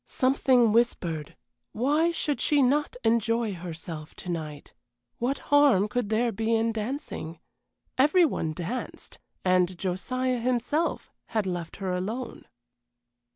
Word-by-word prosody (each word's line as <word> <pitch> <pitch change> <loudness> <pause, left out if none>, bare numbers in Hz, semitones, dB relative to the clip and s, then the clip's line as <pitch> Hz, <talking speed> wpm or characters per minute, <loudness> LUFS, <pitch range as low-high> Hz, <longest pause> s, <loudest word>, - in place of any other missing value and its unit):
Something 255 -3 +3
whispered, 175 -10 0 0.4
Why 295 +8 +2
should 300 -4 -2
she 290 -2 +3
not 285 +3 +1
enjoy 230 -1 +1
herself 165 -3 -7
to 180 - -8
night? 155 -4 -5 0.5
What 255 +4 0 0.2
harm 275 -9 +5
could 245 -1 -2
there 230 +2 +2
be 225 +2 0
in 225 +1 +1
dancing? 215 - -5 0.6
Every 320 +6 +5
one 160 - -2
danced 180 +11 -6 0.3
and 185 -1 +3
Josiah, 250 +8 -1
himself, 255 +7 -1 0.2
had 215 -3 -1
left 175 -3 -4
her 190 -2 -3
alone. 215 +8 -4
225 Hz, 120 wpm, -27 LUFS, 180-255 Hz, 0.6 s, harm